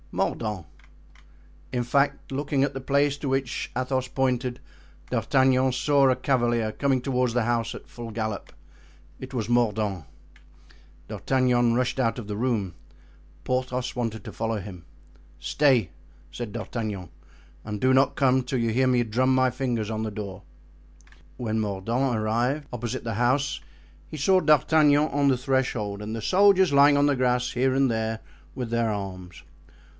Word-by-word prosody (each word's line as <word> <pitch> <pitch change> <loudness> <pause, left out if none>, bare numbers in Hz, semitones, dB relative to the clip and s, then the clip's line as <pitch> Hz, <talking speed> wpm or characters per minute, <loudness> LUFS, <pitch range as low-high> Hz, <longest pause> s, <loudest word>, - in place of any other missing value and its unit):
"Mordaunt." 105 -7 -2 1.1
In 125 -1 -1
fact, 140 +4 0
looking 140 0 0
at 140 - -1
the 135 - -5
place 140 +1 +1
to 140 - -3
which 135 -2 -2
Athos 130 0 -1
pointed, 125 -2 -1 0.5
D'Artagnan 130 -1 +2
saw 140 +1 +3
a 130 - +3
cavalier 120 -4 +1
coming 135 -3 0
toward 125 -2 0
the 120 0 +1
house 120 -1 -1
at - - -11
full 120 -1 -8
gallop. 110 -1 -4 0.7
It 130 +1 -9
was 115 -5 -2
Mordaunt. 105 - 0 1.0
D'Artagnan 125 -3 +1
rushed 125 +1 0
out 115 -2 +1
of 110 - -8
the 105 - -4
room. 110 -6 -1 0.7
Porthos 125 0 -2
wanted 115 -4 -3
to - - -8
follow 115 0 -2
him. 90 -3 -9 0.6
"Stay," 130 - +2 0.4
said 120 -3 -6
D'Artagnan, 105 -5 -5 0.5
"and 105 -1 -5
do 130 +3 +3
not 135 +1 +3
come 130 -1 +3
till 125 +1 -2
you 115 -1 0
hear 130 +3 +2
me 125 -1 +3
drum 125 +4 +1
my 130 0 +3
fingers 120 -5 -2
on 110 0 -2
the 110 - -3
door." 100 -3 -7 1.0
When 110 -2 -2
Mordaunt 110 +5 -1
arrived 120 +7 0
opposite 120 -1 -4
the 115 -1 -3
house 130 +5 0 0.5
he 155 - -7
saw 185 +6 +3
D'Artagnan 150 0 +4
on 140 0 +2
the 130 - +2
threshold 125 -6 -1
and 105 +1 -5
the 115 - -5
soldiers 190 - +4
lying 140 +1 +6
on 145 - +4
the 145 -1 +2
grass 125 -1 +1
here 130 +1 +1
and 135 0 +2
there, 110 -1 -2 0.4
with 125 -3 -4
their 115 -1 +1
arms. 95 -3 -6
125 Hz, 155 wpm, -25 LUFS, 110-135 Hz, 1.1 s, lying